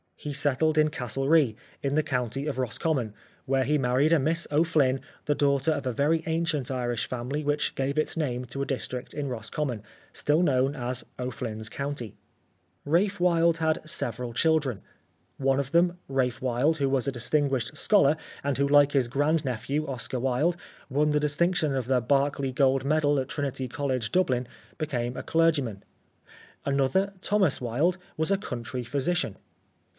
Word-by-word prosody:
He 150 - -6
settled 145 +2 +1
in 155 0 +4
Castlerea, 135 0 +1 0.3
in 140 0 0
the 155 - +4
county 130 -1 -2
of 150 -4 -3
Roscommon, 130 -2 -1 0.3
where 135 0 +2
he 150 +4 +2
married 135 +5 +3
a 165 - +5
Miss 165 +5 0
O'Flyn, 150 -4 +3 0.3
the 145 - +1
daughter 140 +1 +2
of 145 -3 -2
a - - +1
very 155 +6 +1
ancient 160 -5 -1
Irish 120 -3 -2
family 130 +5 -3
which 145 0 0
gave 135 +2 -1
its 155 - 0
name 125 -5 -1
to 130 +3 -5
a - - 0
district 130 -2 -4
in 145 -2 -2
Roscommon, 120 0 -3 0.3
still 150 +3 +1
known 135 -2 +2
as 125 -2 -4
O'Flyn's 115 -3 -4
County. 140 -4 -5 0.7
Ralph 185 +7 +2
Wilde 170 -2 +3
had 160 -1 0
several 120 -4 -3
children. 140 - +1 0.6
One 135 0 +2
of 140 -1 -3
them, 175 +1 +3
Ralph 130 -2 0
Wilde, 130 +5 +1
who 140 -2 +1
was 135 -2 0
a - - +1
distinguished 135 0 0
scholar, 175 -9 +4 0.3
and 140 -2 0
who 140 0 +2
like 145 0 +5
his 135 -4 +2
grand 145 +5 +1
nephew, 135 +5 -2
Oscar 130 -1 -3
Wilde, 135 +7 +1 0.3
won 150 +3 +2
the 150 - +3
distinction 150 0 +1
of 130 -3 -1
the 125 0 +2
Berkeley 140 +1 +1
Gold 135 0 +2
Medal 145 -1 +2
at 130 - -2
Trinity 135 -3 -3
College, 130 -2 -2
Dublin, 130 -10 +1 0.3
became 125 -5 -2
a - - -4
clergyman; 145 -11 +1 0.8
another, 140 +9 +1
Thomas 195 -8 +2
Wilde, 140 +10 +1 0.2
was 160 +2 0
a 195 - +4
country 125 - -5
physician. 140 - -1
140 Hz, 165 wpm, -27 LUFS, 125-155 Hz, 0.8 s, a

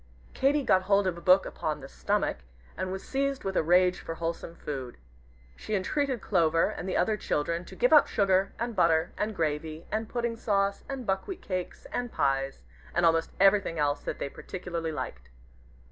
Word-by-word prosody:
Katy 280 +2 +2
got 190 -7 +4
hold 200 +1 +3
of 185 -2 0
a 170 - -10
book 185 +2 +5
upon 155 -1 -3
"The 135 - -8
Stomach," - - -1 0.4
and 185 0 -3
was 190 0 -6
seized 275 0 -1
with 195 -1 -3
a - - +4
rage 180 +3 +4
for 165 - -6
wholesome 165 0 -4
food. 135 -6 -6 0.6
She 215 - -3
entreated 260 +5 0
Clover 165 0 +2
and 190 - -5
the - - 0
other 215 - +2
children 170 0 -1
to 190 - -11
give 245 +8 +3
up 300 - +8
sugar, 195 -1 +2
and 235 0 -3
butter, 165 -2 +3
and 210 0 -2
gravy, 155 0 -2
and 220 +1 -2
pudding 235 -1 -2
sauce, 200 -3 0
and 270 -3 -4
buckwheat 195 - -2
cakes, 185 -2 -4
and 245 -1 -2
pies, 135 - 0 0.3
and 175 - +3
almost 165 0 +2
everything 195 -3 +4
else 145 -1 +1
that - - -4
they - - -3
particularly 170 +1 -5
liked. 60 - -6
185 Hz, 185 wpm, -28 LUFS, 165-215 Hz, 0.6 s, up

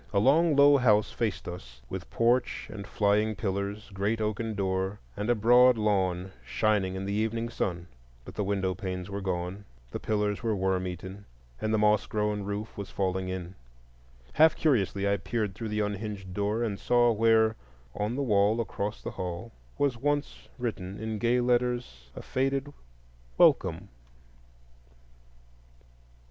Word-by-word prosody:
A 100 - 0
long 150 +7 +4
low 140 0 +7
house 110 -5 +3
faced 110 -4 -2
us, 60 -9 -8
with - - -6
porch 120 +2 +1
and 100 -2 -7
flying 105 +1 +1
pillars, 100 +2 -3
great 100 +4 0
oaken 110 +1 -2
door, 95 +1 -1 0.2
and 105 +3 -3
a 120 - +4
broad 120 +3 +6
lawn 95 -3 0
shining 105 -4 +1
in 95 +1 -4
the 100 - -2
evening 110 +2 -1
sun. 85 -6 -3 0.4
But - - -9
the 105 - -2
window 95 -2 0
panes 90 +1 -5
were 100 0 -3
gone, 90 +1 -3 0.3
the - - -4
pillars 105 -1 -1
were 115 -2 0
worm 95 -1 0
eaten, 95 +3 -7 0.4
and 110 - 0
the 110 - +3
moss 105 0 +3
grown 105 -1 -1
roof 100 +2 -5
was 100 - -5
falling 95 -1 -1
in. 95 -1 -5 0.8
Half 160 +1 +6
curiously 100 - +1
I 100 0 +2
peered 105 -2 -2
through 110 +3 -5
the 105 0 -1
unhinged 105 -2 -4
door, 105 +4 0
and 105 -4 -2
saw 120 -1 +3
where, 110 0 +3 0.4
on 105 +4 -2
the 140 - -1
wall 105 -1 +3
across 105 -2 -3
the - - -4
hall, 90 +5 -5 0.3
was 140 -4 +1 0.6
written 100 -6 -4
in 110 +1 -5
once 110 -1 -3
gay 120 +1 +3
letters 120 - 0
a - - -8
faded 135 +2 -1 0.6
"Welcome." - - +3
105 Hz, 155 wpm, -28 LUFS, 95-115 Hz, 0.8 s, low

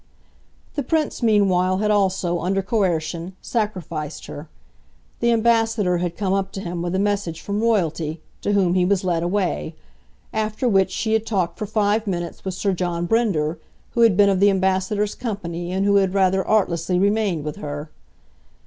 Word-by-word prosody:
The 290 - -1
Prince 305 +2 -1
meanwhile 190 -5 +3
had 210 +1 +1
also, 190 -4 +1
under 195 +3 0
coercion, 175 -4 -1
sacrificed 170 - -3
her; 150 +2 -9 0.7
the 235 0 +2
Ambassador 225 -5 +2
had 175 -1 -3
come 195 -2 0
up 195 0 -1
to - - -5
him 175 -3 -4
with 175 +1 -2
a - - +2
message 200 -4 -1
from 205 +1 -3
Royalty, 165 -8 0 0.2
to 205 - 0
whom 190 -3 +3
he 185 -1 +3
was 195 +1 +1
led 175 -3 0
away; 175 -3 -1 0.6
after 220 +3 -1
which 195 -4 +3
she 220 +4 -1
had 220 -1 +2
talked 185 -5 -1
for 210 - -3
five 215 +1 +1
minutes 175 -3 -4
with 190 -2 -3
Sir 195 +1 0
John 175 -1 -2
Brinder, 170 -7 +1 0.3
who 235 - 0
had 225 -5 +5
been 205 -1 +6
of 190 -2 +2
the 200 +1 +6
Ambassador's 190 +2 +1
company 175 -6 -4
and 190 +1 0
who 200 0 +4
had 195 -1 +1
rather 190 0 +3
artlessly 180 -4 +1
remained 200 -4 +1
with 150 0 -5
her. 145 +1 -6
190 Hz, 175 wpm, -22 LUFS, 175-210 Hz, 0.7 s, been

